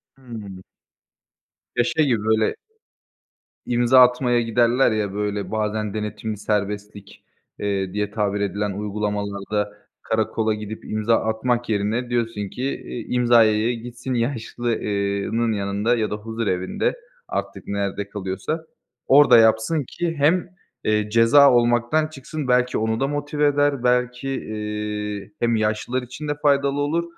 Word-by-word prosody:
Hı. 110 -8 -9 1.1
Ya, 120 - +3
şey 155 +4 +1
gibi, 120 -5 +1
böyle 110 0 +2 1.1
imza 120 +1 +4
atmaya 125 -1 +4
giderler, 120 +2 +3
ya, 105 -3 -1
böyle, 105 -1 -3
bazen 110 -1 -1
denetimli 105 0 -4
serbestlik, 105 -1 -4 0.4
eee, 100 -2 -2
diye 105 -1 -2
tabir 105 -1 -1
edilen 100 0 -1
uygulamalarda 105 0 -3 0.3
karakola 110 0 0
gidip 105 0 -7
imza 110 +2 +1
atmak 120 +2 -1
yerine 110 +4 -1
diyorsun 115 -4 -2
ki, 125 - -6
eee, 135 -2 -4 0.2
imzaya 115 -3 +4
ya 120 - +1
gitsin 120 +2 -6
yaşlı 120 -1 -1
eee 100 -1 -1
nın 115 0 +1
yanında 105 +3 0
ya 110 -2 -1
da - - -1
huzurevinde, 105 -4 -2 0.3
artık - - -5
nerede 100 0 -3
kalıyorsa, 100 - -4 0.4
orada 140 -3 +7
yapsın 110 +7 +3
ki 170 -1 -3
hem, 170 +5 +2 0.3
eee, 105 -1 +1
ceza 115 +6 +6
olmaktan 120 +6 +2
çıksın, 150 -1 -6
belki 125 0 +2
onu 110 +1 0
da 135 - +1
motive 145 0 0
eder, 145 -2 +1
belki, 125 +1 +1
eee, 105 -3 -4
hem 115 -1 +2
yaşlılar 110 +4 -1
için 125 +5 -8
de 145 - -1
faydalı 140 -1 +2
olur. 160 +4 0
110 Hz, 130 wpm, -22 LUFS, 105-125 Hz, 1.1 s, orada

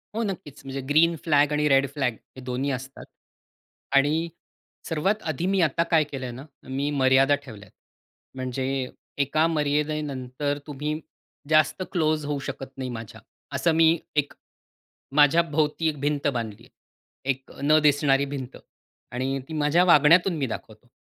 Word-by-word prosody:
हो, 230 - 0
नक्कीच. 175 -8 -6
म्हणजे 135 0 -4
ग्रीन 165 +3 +4
फ्लॅग 145 -2 +3
आणि 150 0 +1
रेड 135 0 +4
फ्लॅग 135 -5 0 0.2
हे 130 - -9
दोन्ही 130 +3 -2
असतात. 135 +1 -6 0.9
आणि 150 +4 +3 0.6
सर्वात 195 +7 0
आधी 155 +3 -2
मी 195 -1 +2
आता 165 +1 +2
काय 160 -2 +5
केलंय 135 -4 -6
ना, 125 +3 -9 0.2
मी 135 +2 -2
मर्यादा 135 0 +4
ठेवल्यात. 105 -6 -12 0.6
म्हणजे 130 0 -2 0.3
एका 155 +3 +2
मर्यादेनंतर 145 -3 -1
तुम्ही 150 +1 -3 0.5
जास्त 155 +3 +3
क्लोज 155 -4 +1
होऊ 145 -1 -2
शकत 135 0 -7
नाही 130 -1 -4
माझ्या. 115 -3 -8 0.3
असं 170 - +2
मी 165 +1 +5 0.2
एक 145 -1 0 0.8
माझ्याभोवती 150 +1 +3
एक 150 -2 -6
भिंत 145 0 0
बांधली 115 -6 -3
आहे. - - -19 0.6
एक 130 0 -8
अ, - - -12
न 155 +2 +5
दिसणारी 140 -2 +3
भिंत 135 -3 -6 0.5
आणि 130 +2 -2
ती 160 - -8
माझ्या 155 +3 +3
वागण्यातून 170 +3 +6
मी 140 - 0
दाखवतो. 110 0 -8
145 Hz, 145 wpm, -25 LUFS, 135-155 Hz, 0.9 s, वागण्यातून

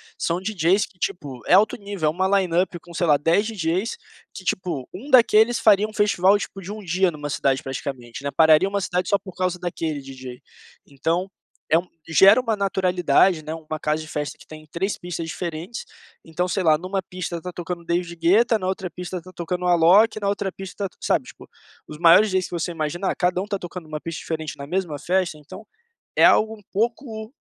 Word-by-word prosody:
são 170 +1 -1
DJs 190 -1 +1
que 185 - -26
tipo 140 -9 -4
é - - +4
alto 210 +2 +4
nível, 200 -6 -5
é - - +4
uma 190 +4 0
line 180 -3 -2
up 185 -1 -3
com 175 +1 -15
sei 175 0 0
lá 150 -2 +5
dez 165 +8 +2
DJs 190 - -2 0.3
que, 190 - -10
tipo, 175 -9 -2
um 235 +11 -9
daqueles 235 -2 +5
fariam 210 0 +4
um - - -13
festival, 205 -2 +3
tipo, 195 -1 -7
de 190 +2 -7
um 215 0 -7
dia 185 +1 +2
numa 145 -3 -6
cidade 135 -1 0
praticamente, 130 -2 -6
né, 140 - -1
pararia 160 +5 +5
uma 200 0 -1
cidade 180 -1 -2
só 200 - +4
por 190 -2 -12
causa 185 -1 -1
daquele 165 -4 -3
DJ, 130 -2 -9 0.5
então 165 +6 -1 0.4
é 160 - +4
um 180 - -9 0.2
gera 195 +7 +7
uma 230 -3 0
naturalidade, 185 -4 +2
né, 155 - -6
uma 155 -1 -6
casa 155 +1 -1
de - - -11
festa 150 -1 -4
que - - -17
tem 155 0 -12
três 190 +4 -2
pistas 175 -2 -5
diferentes, 170 +6 -5 0.4
então 165 +3 -2
sei 190 +2 -1
lá 160 -3 +4
numa 185 +4 -3
pista 180 -1 -5
está 180 +2 -7
tocando 175 0 -6
David 170 0 -2
Gueta, 215 +7 +3
na 185 - -3
outra 190 0 -2
pista 180 +1 -6
está 185 +1 -10
tocando 180 +1 -3
Alok, 180 +6 +5
na 200 - 0
outra 200 -1 -2
pista 195 +2 -6
está 190 - -8
sabe, - - +1
tipo, - - -14 0.4
os 150 - -9
maiores 175 +6 +6
DJs 185 -1 0
que - - -10
você 175 0 -2
imaginar, 170 +3 -2
cada 180 0 +1
um 200 - -6
tá 200 - -2
tocando 180 -2 -8
numa 155 -1 -6
pista 165 +1 -6
diferente 160 -2 -4
na 140 - -7
mesma 175 -3 -2
festa, 175 -1 -1
então 185 +8 -12 0.5
é - - +5
algo 220 +1 +4
um 210 - -19
pouco 220 +1 -2
180 Hz, 210 wpm, -23 LUFS, 160-195 Hz, 0.5 s, gera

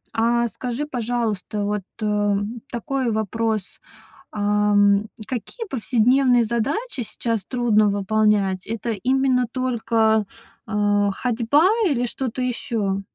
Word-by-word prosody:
А 235 +1 +2
скажи, 250 +6 -3
пожалуйста, 230 -6 -2
вот, 205 0 -1 0.2
эм, 210 +2 0
такой 260 0 -2
вопрос. 220 -1 -2 0.5
Ам, 205 0 +3 0.2
какие 270 - -5
повседневные 250 - +3
задачи 260 - -2
сейчас 225 -2 -3
трудно 225 -4 +2
выполнять? 200 -1 +1
Это 230 +1 -4
именно 250 +4 +1
только, 225 -4 +1 0.4
а, 205 -2 +1
ходьба 250 - +2 0.2
или 245 -5 +1
что-то 255 0 -4
ещё? 220 -5 -1
225 Hz, 100 wpm, -22 LUFS, 210-250 Hz, 0.5 s, Ам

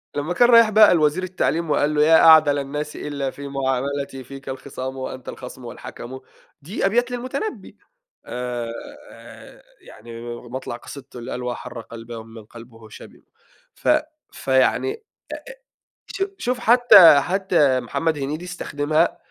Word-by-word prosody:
لمّا 145 +4 -2
كان 240 +6 +4
رايح 230 -2 +7
بقى 215 -1 +6
لوزير 155 +2 +1
التعليم، 170 -3 -1
وقال 150 0 +1
له: 150 - +4
"يا 160 +1 +6
أعدل 155 -3 +7
الناس 150 +2 -5
إلّا 140 -2 -4
في 140 +1 -9
معاملتي، 135 0 -3
فيك 135 +2 -10
الخِصام 130 0 -6
وأنتَ 130 0 -7
الخَصمُ 125 0 -10
والحَكَمُ." 120 +2 -9 0.4
دي 180 +9 -3
أبيات 240 +5 +1
للمتنبّي، 255 - -5 0.5
آآ، 125 - -8 0.2
يعني 115 +1 -12 0.2
مطلع 125 0 -7
قصيدته 130 +1 -11
اللي 120 +2 -8
قال 125 - -5
"واحرّ 120 -1 -6
قَلباه 115 +1 -10
ومِمَّن 115 -1 -11
قَلبُه 115 -1 -14
شَبِم." - - -14 0.5
ف - - -8 0.4
فيعني 130 - +1
أ - - -8
أ 450 - -19 1.1
شو 390 0 -2
شوف، 250 0 -2
حتّى، 230 -11 +7
حتّى 175 -7 +2
محمد 155 +6 -2
هنيدي 150 +5 -4
استخدمها، 155 -2 -1
140 Hz, 135 wpm, -22 LUFS, 125-180 Hz, 1.1 s, رايح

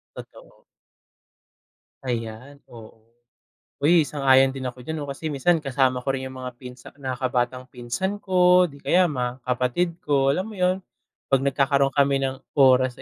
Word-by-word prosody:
Totoo. - - -14 1.4
Ayan, 120 +3 -5
oo. 115 -1 -14 0.8
Uy, 160 +1 +4
sang-ayon 135 -2 +3
din 135 - -7
ako 125 0 -13
diyan 160 - -4
'no, 145 - -6
kasi 140 +3 -7
minsan 165 +5 +2
kasama 130 -4 0
ko 135 - 0
rin 130 0 -4
yung 130 - -11
mga 125 -1 -6
pinsa 125 0 -12
nakakabatang 130 -1 -2
pinsan 130 +12 -4
ko 180 -1 +4
o - - +5
di 140 - -14
kaya 180 +4 +2
mga 125 -2 -4
kapatid 125 +8 -1
ko, 140 -2 +2
alam 185 +8 0
mo 220 - -9
yun. 185 -1 +1 0.6
Pag 135 - +5
nagkakaroon 140 0 +2
kami 140 -1 +1
ng 135 -1 -2 0.2
oras 130 -2 +3
135 Hz, 155 wpm, -23 LUFS, 125-145 Hz, 1.4 s, o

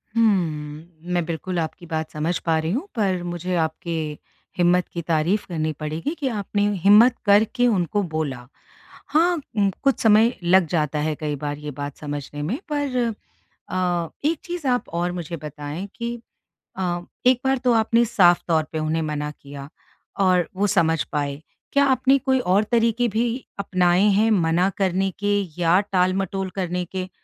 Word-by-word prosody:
हुँ। 160 -9 +1 0.3
मैं 175 -1 +1
बिल्कुल 170 +2 -3
आपकी 165 +2 -4
बात 160 -2 -3
समझ 160 +3 -1
पा 165 -1 +2
रही 160 +1 -2
हूँ, 280 - -2
पर 195 -5 0
मुझे 175 +1 -3
आपके 165 +1 -2 0.7
हिम्मत 180 0 +3
की 170 - -3
तारीफ़ 170 +5 0
करनी 155 -2 -1
पड़ेगी 155 - -3
कि 280 - -1
आपने 205 -3 -1
हिम्मत 210 +7 +6
करके 220 +5 +4
उनको 205 -2 +1
बोला। 155 -7 -4 0.6
हाँ, 340 +3 +3 0.2
उ 200 -1 +3
कुछ 275 -1 +2
समय 220 +2 +5
लग 180 +1 +5
जाता 150 -2 0
है 155 +1 -1
कई 150 -1 -2
बार 145 0 -4
ये 150 0 -6
बात 145 0 -5
समझने 145 -1 -6
में 195 - -2
पर 285 -3 -1 0.7
अ, 175 -2 -1 0.2
एक 315 +1 +1
चीज़ 345 -5 -5
आप 245 -1 0
और 175 +1 -1
मुझे 175 -2 -5
बताएँ 150 +5 -6
कि 235 0 -4 0.6
अ, 175 -2 -1 0.2
एक 250 -1 +5
बार 265 0 +3
तो 245 - +5
आपने 230 +1 +3
साफ़ 180 -6 +4
तौर 160 -2 +2
पे 160 - -1
उन्हें 155 +1 -1
मना 150 -1 -3
किया, 140 -1 -11 0.5
और 185 -3 +3
वो 200 +2 +1
समझ 165 -5 +2
पाए। 145 -1 -2 0.3
क्या 280 0 +4
आपने 265 0 +3
कोई 265 0 +1
और 200 -2 +2
तरीके 235 +1 +2
भी 225 +3 0 0.3
अपनाएँ 185 0 +3
हैं 215 +3 +3
मना 175 -1 +2
करने 195 -1 +1
के 205 0 +1 0.2
या 170 +2 +4
टालमटोल 190 +1 0
करने 180 -2 -2
के? 185 +1 -5
180 Hz, 165 wpm, -23 LUFS, 160-215 Hz, 0.7 s, हिम्मत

